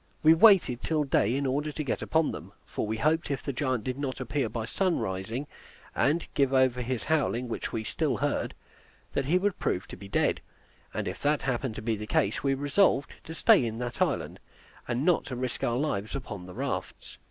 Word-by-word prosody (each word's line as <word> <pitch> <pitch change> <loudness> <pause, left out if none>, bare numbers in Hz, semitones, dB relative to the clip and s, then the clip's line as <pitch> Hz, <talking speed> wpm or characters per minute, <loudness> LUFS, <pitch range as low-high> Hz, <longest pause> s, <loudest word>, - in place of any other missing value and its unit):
We 160 +1 +8
waited 170 - +6
till 155 -2 +1
day 125 -4 +2
in 140 +1 -1
order 145 +3 0
to 155 - -4
get 135 - -2
upon 160 -1 +1
them, - - -9
for - - -3
we 110 +1 -2
hoped 155 +6 +1
if 140 -3 -2
the 140 - -3
giant 130 -4 -1
did 130 +3 -3
not 135 -2 -3
appear 130 -1 -1
by 110 +1 -3
sunrising, 115 - -1 0.5
and 150 +7 +2
give 140 -2 +2
over 130 -1 +3
his 125 -1 -2
howling, 135 -5 0
which 115 - -4
we 110 - -2
still - - -1
heard, - - -1 0.6
that 140 - 0
he 165 +7 +3
would 195 +1 0
prove 90 - -1
to - - -7
be 100 - -11
dead; - - +1 0.5
and - - -3
if - - -5
that 145 0 +1
happened 130 -3 -1
to 110 - -6
be 115 0 0
the 105 0 -6
case, 100 0 +1
we 135 -1 +1
resolved 145 +1 +2
to 160 - -7
stay 145 - +5
in 115 -1 -3
that 120 0 -5
island, - - 0 0.5
and 120 +5 -1
not 175 -2 +3
to 130 - -5
risk 125 -1 -4
our 120 0 +1
lives 110 -7 -2
upon 105 -9 -6
the 90 - -10
rafts. - - -5
130 Hz, 210 wpm, -28 LUFS, 115-150 Hz, 0.6 s, We